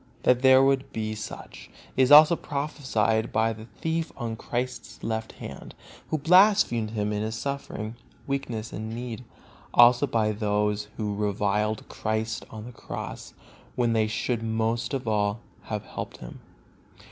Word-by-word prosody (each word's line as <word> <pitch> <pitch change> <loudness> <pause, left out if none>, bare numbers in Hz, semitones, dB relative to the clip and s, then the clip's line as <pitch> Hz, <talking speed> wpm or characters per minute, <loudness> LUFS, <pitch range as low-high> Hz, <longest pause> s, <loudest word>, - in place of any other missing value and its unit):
That 125 0 +4
there 130 0 +7
would 135 0 +2
be 110 -1 -3
such 110 0 -8 0.3
is 130 +1 +3
also 155 +3 +9
prophesied 130 -8 -1
by 115 0 +2
the 110 0 -10
thief 160 +6 -3
on 115 -3 -3
Christ's 125 +3 -5
left 110 0 -3
hand, - - -9 0.3
who 155 - 0
blasphemed 175 - +4
Him 105 -1 -2
in 105 - -1
His 110 +1 -3
suffering, 120 -4 -4 0.3
weakness 120 -6 -3
and 110 +1 -5
need; 120 +1 -6 0.5
also 120 +3 +7
by 110 -4 +1
all - - 0
those 105 0 0
who 105 -2 -2
reviled 105 +1 -1
Christ 110 0 -3
on 110 -1 -8
the 125 - -8
Cross, - - -7 0.4
when 120 -2 +1
they 110 -1 +2
should 115 +2 -1
most 115 +3 -1
of 130 -3 -4
all 105 0 0 0.2
have - - -4
helped - - -7
Him. - - -10
115 Hz, 150 wpm, -26 LUFS, 110-130 Hz, 0.5 s, also